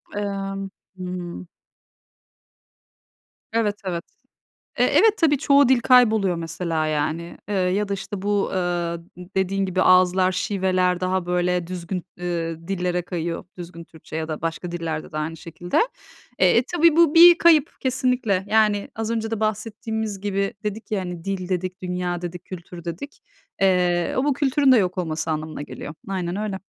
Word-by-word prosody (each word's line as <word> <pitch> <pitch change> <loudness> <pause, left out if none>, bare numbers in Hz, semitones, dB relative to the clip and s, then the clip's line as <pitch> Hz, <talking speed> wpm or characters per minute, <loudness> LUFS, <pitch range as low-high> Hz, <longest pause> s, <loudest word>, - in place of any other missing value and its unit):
Emm. 195 -1 -3 0.3
Hı 185 - -7
hı. 180 -1 -6 2.1
Evet, 215 -3 +1
evet. 170 -2 -3 0.7
E, - - +2
evet, 440 -1 +4
tabii 295 -4 +3
çoğu 280 -2 +4
dil 260 -2 +5
kayboluyor 220 -7 +4
mesela 165 -1 -2
yani. 155 +3 -2
Iıı, 205 - -1 0.2
ya 205 +1 0
da, - - 0
işte, 195 0 -5
bu, 205 0 0
ııı, 175 -2 -2 0.3
dediğin 195 +1 +1
gibi 185 0 0
ağızlar, 185 0 +4
şiveler 185 -2 0
daha 185 -1 -1
böyle 180 -1 0
düzgün, 180 0 -4 0.2
ııı, 165 -1 -3
dillere 180 -2 -1
kayıyor. 170 -1 -4
Düzgün 170 -1 -8
Türkçe 160 -1 -12
ya 160 0 -2
da 155 -1 -5
başka 165 +1 -3
dillerde 165 -3 -4
de 155 - -5
aynı 160 +2 -3
şekilde. 170 +2 -4 0.6
Eee, 185 +3 +5
e, 240 - +4
tabii 335 -1 +5
bu 335 -3 +5
bir 345 +1 +9
kayıp 320 -3 +5
kesinlikle. 250 -7 0
Yani 210 -1 +2
az 225 0 -3
önce 225 -1 -2
de 220 - -2
bahsettiğimiz 215 -1 -3
gibi. 200 -1 -1
Dedik 210 +2 -5
ya, 205 - +1
hani, 175 -2 -6
"dil" 195 -2 -3
dedik, 185 0 -3
"dünya" 180 -1 -3
dedik, 175 0 -6
"kültür" 175 -1 -9
dedik. 175 - -7 0.4
Eee, 180 -2 +2
o 260 - +2
bu 290 - +2
kültürün 275 0 +3
de 250 - +7
yok 185 -2 0
olması 160 -2 -2
anlamına 155 -1 -4
geliyor. 145 +1 -8 0.2
Aynen 180 -2 -2
öyle. 205 -2 -3
185 Hz, 160 wpm, -23 LUFS, 175-215 Hz, 2.1 s, bir